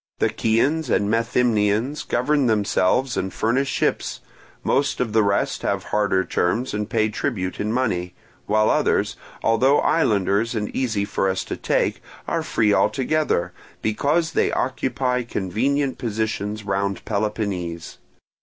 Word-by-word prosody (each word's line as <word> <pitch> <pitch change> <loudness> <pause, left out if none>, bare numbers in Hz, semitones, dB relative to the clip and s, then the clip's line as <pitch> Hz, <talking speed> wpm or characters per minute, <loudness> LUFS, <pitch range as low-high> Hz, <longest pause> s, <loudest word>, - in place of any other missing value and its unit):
The - - +2
Chians 130 +7 +1
and 100 -2 +2
Methymnians 115 +2 +1
govern 145 -3 +1
themselves 110 +3 +1
and 95 - -2
furnish 125 +8 0
ships; - - -1 0.4
most 140 - +1
of 115 -4 -1
the 110 - +5
rest 100 -1 0
have - - -1
harder 100 -3 +1
terms 115 +9 0
and 105 0 -2
pay 110 -3 +2
tribute 100 -5 -3
in 105 +1 -1
money; 110 -8 -1 0.3
while 110 +1 +3
others, - - +1 0.3
although 130 +5 +4
islanders 110 - +1
and 105 -1 -3
easy 110 -6 0
for 100 -1 0
us 95 0 -1
to - - -5
take, - - 0 0.3
are - - 0
free 105 -3 +1
altogether, 140 - +1 0.3
because 145 +10 +1
they - - +1
occupy 130 0 -1
convenient 125 +6 -1
positions 110 -2 -2
round 100 -1 -2
Peloponnese. 100 -5 -3
110 Hz, 135 wpm, -22 LUFS, 100-130 Hz, 0.4 s, the